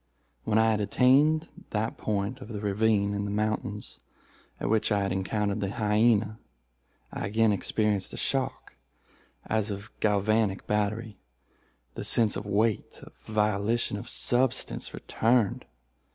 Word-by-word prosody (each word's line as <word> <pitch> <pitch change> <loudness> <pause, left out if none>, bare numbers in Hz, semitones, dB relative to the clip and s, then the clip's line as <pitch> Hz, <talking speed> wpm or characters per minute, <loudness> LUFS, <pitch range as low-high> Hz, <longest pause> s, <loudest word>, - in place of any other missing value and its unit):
When 105 - +2
I 110 0 +4
had 105 -1 0
attained 145 +9 +3 0.2
that 110 +2 -2
point 105 +5 -2
of 130 - -8
the 110 -3 -5
ravine 100 0 +1
in 100 0 -2
the - - -3
mountains 105 0 -3 0.6
at - - -2
which 110 +1 +1
I 100 -1 +2
had 95 - -1
encountered 100 +2 -1
the 100 -1 -2
hyena, 110 +1 +2 0.7
I - - -3
again 110 +1 +3
experienced 105 0 0
a - - -8
shock 135 -1 -2 0.7
as 110 0 0
of 100 0 -5
a - - -18
galvanic 105 -1 +1
battery; 105 0 -2 0.7
the - - -6
sense 110 -3 +3
of 105 - -5
weight, 105 +1 0
of - - -13
volition, 105 +1 0
of 105 +4 -6
substance, 125 +1 +1
returned. 115 -2 0
105 Hz, 140 wpm, -28 LUFS, 100-115 Hz, 0.7 s, I